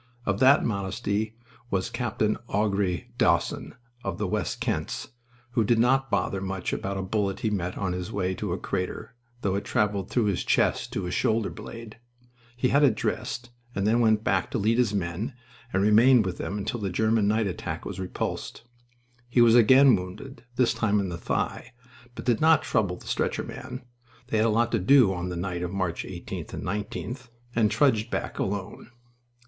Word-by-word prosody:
Of 100 Hz, 0 st, 0 dB
that 135 Hz, +2 st, +6 dB
modesty 100 Hz, +1 st, -2 dB, 0.3 s
was 95 Hz, -3 st, -1 dB
Capt. 120 Hz, -4 st, -4 dB
Augrere 100 Hz, -4 st, 0 dB
Dawson, -, -, +1 dB, 0.3 s
of 95 Hz, -3 st, -3 dB
the 105 Hz, -, -1 dB
West 95 Hz, +1 st, -2 dB
Kents, -, -, -2 dB, 0.4 s
who 120 Hz, -2 st, +2 dB
did 115 Hz, +2 st, +3 dB
not 135 Hz, +3 st, +3 dB
bother 100 Hz, -1 st, 0 dB
much 95 Hz, -1 st, -3 dB
about 100 Hz, 0 st, -3 dB
a 95 Hz, -, -2 dB
bullet 100 Hz, +1 st, -1 dB
he 110 Hz, -4 st, 0 dB
met 90 Hz, -3 st, -2 dB
on 95 Hz, -2 st, -1 dB
his 90 Hz, +3 st, -4 dB
way 95 Hz, -3 st, -1 dB
to 100 Hz, 0 st, -4 dB
a 90 Hz, -, -1 dB
crater, 95 Hz, +5 st, -4 dB, 0.3 s
though 100 Hz, -, 0 dB
it 100 Hz, -, -1 dB
traveled 100 Hz, -2 st, 0 dB
through 120 Hz, -, +1 dB
his 100 Hz, -4 st, 0 dB
chest -, -, +1 dB
to 100 Hz, -, -2 dB
his 90 Hz, -, -3 dB
shoulder 110 Hz, -1 st, +1 dB
blade. 115 Hz, -1 st, -9 dB, 0.6 s
He 125 Hz, 0 st, +2 dB
had 140 Hz, +1 st, +4 dB
it 130 Hz, -7 st, +5 dB
dressed, 120 Hz, +3 st, -3 dB, 0.2 s
and 100 Hz, -, 0 dB
then 115 Hz, +3 st, +3 dB
went 110 Hz, -2 st, +3 dB
back 95 Hz, -4 st, +1 dB
to -, -, -2 dB
lead 110 Hz, +4 st, +2 dB
his 120 Hz, -4 st, +3 dB
men, 100 Hz, +6 st, -3 dB, 0.4 s
and 95 Hz, -, +1 dB
remained 110 Hz, +3 st, +6 dB
with 90 Hz, -2 st, -4 dB
them 100 Hz, -, -3 dB
until 120 Hz, +4 st, -3 dB
the 100 Hz, -2 st, -2 dB
German 110 Hz, +3 st, +2 dB
night 110 Hz, +1 st, +2 dB
attack 90 Hz, -4 st, -4 dB
was 95 Hz, -2 st, -5 dB
repulsed. 95 Hz, +4 st, -4 dB, 0.7 s
He 125 Hz, -, +2 dB
was 120 Hz, -1 st, +7 dB
again 130 Hz, +3 st, +7 dB
wounded, 100 Hz, +10 st, -7 dB
this 125 Hz, -2 st, +3 dB
time 105 Hz, -2 st, +1 dB
in 95 Hz, -2 st, -1 dB
the 85 Hz, -, -4 dB
thigh, 125 Hz, +7 st, -2 dB, 0.4 s
but -, -, -7 dB
did 120 Hz, -3 st, +2 dB
not 160 Hz, -1 st, +5 dB
trouble 100 Hz, -7 st, 0 dB
the -, -, -14 dB
stretcher -, -, -1 dB
men 125 Hz, +1 st, -8 dB, 0.5 s
(they 110 Hz, -, +1 dB
had 110 Hz, +1 st, +3 dB
a -, -, +2 dB
lot 115 Hz, +2 st, +2 dB
to 115 Hz, -, +2 dB
do 110 Hz, 0 st, +5 dB
on 90 Hz, 0 st, -3 dB
the 90 Hz, -, -4 dB
night 90 Hz, 0 st, -3 dB
of 90 Hz, -1 st, -3 dB
March 95 Hz, -3 st, -2 dB
18th -, -, -7 dB
and -, -, -6 dB
19th), 105 Hz, +6 st, -4 dB, 0.3 s
and 110 Hz, -2 st, +3 dB
trudged 110 Hz, -1 st, +2 dB
back -, -, -3 dB
alone. 100 Hz, +3 st, -4 dB
105 Hz, 190 wpm, -26 LUFS, 95-115 Hz, 0.7 s, was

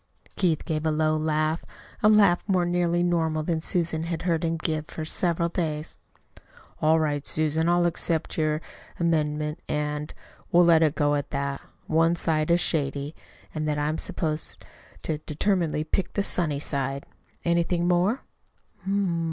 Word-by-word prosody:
Keith 170 Hz, -5 st, +1 dB
gave 155 Hz, -2 st, -2 dB
a 160 Hz, -, +1 dB
low 155 Hz, 0 st, +2 dB
laugh 155 Hz, +1 st, 0 dB, 0.4 s
a 210 Hz, -, +6 dB
laugh 205 Hz, -5 st, +5 dB
more 185 Hz, -3 st, +2 dB
nearly 175 Hz, 0 st, +1 dB
normal 160 Hz, -3 st, +1 dB
than 160 Hz, 0 st, -1 dB
Susan 165 Hz, -1 st, -1 dB
had 165 Hz, -1 st, -3 dB
heard 170 Hz, -2 st, 0 dB
him 165 Hz, 0 st, 0 dB
give 155 Hz, -1 st, -2 dB
for 160 Hz, -, -6 dB
several 170 Hz, +1 st, 0 dB
days. 160 Hz, -3 st, -3 dB, 0.8 s
"All 160 Hz, +1 st, +4 dB
right, 145 Hz, -2 st, 0 dB
Susan, 155 Hz, +2 st, +1 dB
I'll 175 Hz, 0 st, +3 dB
accept 165 Hz, -1 st, -1 dB
your 155 Hz, -1 st, 0 dB, 0.4 s
amendment 150 Hz, -2 st, 0 dB
and 150 Hz, 0 st, -2 dB, 0.4 s
we'll 175 Hz, 0 st, +6 dB
let 165 Hz, -1 st, +6 dB
it 155 Hz, -1 st, +3 dB
go 145 Hz, -1 st, +2 dB
that 140 Hz, 0 st, -3 dB, 0.2 s
one 165 Hz, +2 st, +3 dB
side 155 Hz, -2 st, 0 dB
is 170 Hz, +1 st, +4 dB
shady, 145 Hz, -3 st, 0 dB, 0.4 s
and 155 Hz, -1 st, -2 dB
that 150 Hz, -1 st, 0 dB
I'm 150 Hz, +2 st, -1 dB
supposed 155 Hz, -2 st, -2 dB, 0.4 s
to 155 Hz, -2 st, -2 dB
determinedly 160 Hz, 0 st, 0 dB
pick 180 Hz, +3 st, -2 dB
the 200 Hz, -, 0 dB
sunny 155 Hz, -7 st, 0 dB
side. 140 Hz, -1 st, -2 dB, 0.4 s
Anything 170 Hz, 0 st, +1 dB
more?" 180 Hz, +8 st, +2 dB
160 Hz, 150 wpm, -26 LUFS, 150-170 Hz, 0.8 s, a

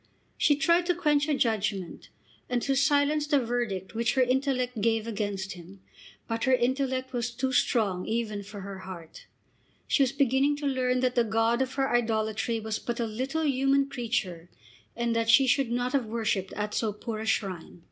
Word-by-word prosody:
She 290 Hz, -, +3 dB
tried 335 Hz, +4 st, +2 dB
to 355 Hz, -, +2 dB
quench 295 Hz, -4 st, +2 dB
her 300 Hz, -, +1 dB
judgment, 210 Hz, -7 st, -1 dB, 0.4 s
and 250 Hz, -1 st, +1 dB
to 275 Hz, -, +1 dB
silence 285 Hz, +2 st, +2 dB
the 290 Hz, -2 st, +3 dB
verdict 235 Hz, -6 st, -3 dB
which 230 Hz, +3 st, 0 dB
her 260 Hz, -, +5 dB
intellect 255 Hz, -2 st, 0 dB
gave 225 Hz, 0 st, +1 dB
against 205 Hz, -3 st, -3 dB
him, 185 Hz, +2 st, -11 dB, 0.5 s
but 230 Hz, +1 st, -2 dB
her 260 Hz, -, +3 dB
intellect 260 Hz, +1 st, -1 dB
was 240 Hz, 0 st, -1 dB
too 260 Hz, +2 st, -2 dB
strong 200 Hz, -8 st, +1 dB
even 220 Hz, -2 st, -2 dB
for 200 Hz, 0 st, -9 dB
her 195 Hz, 0 st, -7 dB
heart. 180 Hz, -4 st, -10 dB, 0.6 s
She -, -, +2 dB
was 260 Hz, -3 st, +3 dB
beginning 275 Hz, +1 st, +2 dB
to 290 Hz, 0 st, -6 dB
learn 255 Hz, -2 st, +1 dB
that 255 Hz, -1 st, +1 dB
the 240 Hz, -, +3 dB
god 225 Hz, +2 st, +1 dB
of 260 Hz, 0 st, -2 dB
her 270 Hz, -1 st, +1 dB
idolatry 225 Hz, 0 st, 0 dB
was 220 Hz, 0 st, -3 dB
but 240 Hz, 0 st, -4 dB
a 235 Hz, -, +1 dB
little 260 Hz, +8 st, -2 dB
human 275 Hz, 0 st, +2 dB
creature, 195 Hz, -10 st, -3 dB, 0.5 s
and 235 Hz, 0 st, -1 dB
that 230 Hz, 0 st, 0 dB
she 270 Hz, +3 st, +7 dB
should 260 Hz, 0 st, +2 dB
not 245 Hz, +2 st, -1 dB
have 265 Hz, -5 st, +1 dB
worshipped 215 Hz, -4 st, -1 dB
at 210 Hz, 0 st, -3 dB
so 220 Hz, -2 st, 0 dB
poor 215 Hz, +1 st, -5 dB
a 220 Hz, -, -5 dB
shrine. 185 Hz, -5 st, -2 dB
235 Hz, 190 wpm, -28 LUFS, 215-270 Hz, 0.6 s, she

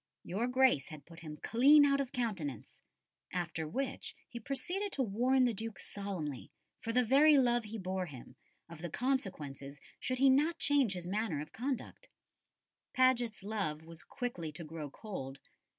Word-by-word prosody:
Your 210 Hz, +7 st, -1 dB
Grace 255 Hz, -, +3 dB
had 155 Hz, -2 st, -10 dB
put 165 Hz, 0 st, -13 dB
him 155 Hz, -2 st, -8 dB
clean 285 Hz, -, +6 dB
out 280 Hz, 0 st, +3 dB
of 265 Hz, -, -4 dB
countenance." 195 Hz, -, -3 dB, 0.5 s
After 165 Hz, -3 st, -2 dB
which 270 Hz, -, -3 dB
he 235 Hz, -, -7 dB
proceeded 355 Hz, -, -3 dB
to 270 Hz, -, +1 dB
warn 250 Hz, +5 st, +3 dB
the 245 Hz, -2 st, +3 dB
Duke 220 Hz, 0 st, -5 dB
solemnly, 180 Hz, -9 st, -5 dB, 0.3 s
"for 230 Hz, -, -3 dB
the 250 Hz, +2 st, +3 dB
very 285 Hz, +5 st, +6 dB
love 240 Hz, -3 st, +3 dB
he 215 Hz, +2 st, -6 dB
bore 185 Hz, -2 st, -2 dB
him," 130 Hz, -6 st, -11 dB, 0.3 s
of 165 Hz, -1 st, -11 dB
the 175 Hz, -, -4 dB
consequences 150 Hz, -, -3 dB, 0.2 s
should 255 Hz, -, -2 dB
he 270 Hz, +2 st, +5 dB
not 305 Hz, +5 st, +3 dB
change 280 Hz, -10 st, +3 dB
his 180 Hz, -2 st, -6 dB
manner 200 Hz, -4 st, -1 dB
of 150 Hz, +1 st, -7 dB
conduct. 255 Hz, +1 st, -4 dB, 0.9 s
Paget's 245 Hz, -5 st, +3 dB
love 195 Hz, -8 st, -2 dB
was 165 Hz, -1 st, -9 dB
quickly 240 Hz, -, -4 dB
to 170 Hz, -, -7 dB
grow 155 Hz, -1 st, -6 dB
cold. 135 Hz, -7 st, -7 dB
220 Hz, 165 wpm, -34 LUFS, 165-255 Hz, 0.9 s, clean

